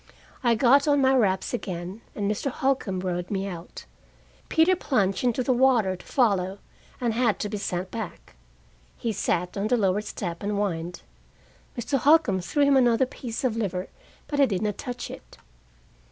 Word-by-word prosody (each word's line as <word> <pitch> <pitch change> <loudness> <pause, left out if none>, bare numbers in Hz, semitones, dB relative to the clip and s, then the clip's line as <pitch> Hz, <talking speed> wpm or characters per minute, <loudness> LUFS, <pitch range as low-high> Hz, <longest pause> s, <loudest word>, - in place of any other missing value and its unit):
I 235 -2 +4
got 270 +5 +4
on 285 -1 +4
my 265 -1 +4
wraps 200 -5 +1
again, 185 -2 -5
and 205 - -3
Mr. 210 +7 -1
Holcombe 255 -8 -1
rowed 180 -1 -3
me 195 -1 -2
out. 175 -3 -8 0.6
Peter 335 +3 +4
plunged 200 - 0
into 250 0 +1
the 255 - +2
water 240 -7 +3
to 180 - -14
follow, 195 -7 +1 0.4
and 240 -2 0
had 230 -2 +2
to 210 - -3
be 210 - -3
sent 180 -1 -3
back. 220 -6 -7 0.6
He 230 - -2
sat 180 -3 -1
on 200 +1 -1
the 245 +2 +2
lower 200 -1 +2
step 175 -5 -5
and 205 +1 -2
whined. 180 -4 -2 0.7
Mr. 250 +4 0
Holcombe 285 - +4
threw 290 - +1
him 280 -1 +5
another 245 0 +4
piece 245 -1 -6
of 245 -4 +1
liver, 190 -5 -2 0.4
but 290 - -3
he 275 - +6
did 200 -3 -2
not 210 -2 -2
touch 245 -1 -5
it. - - -12
215 Hz, 175 wpm, -26 LUFS, 190-255 Hz, 0.7 s, he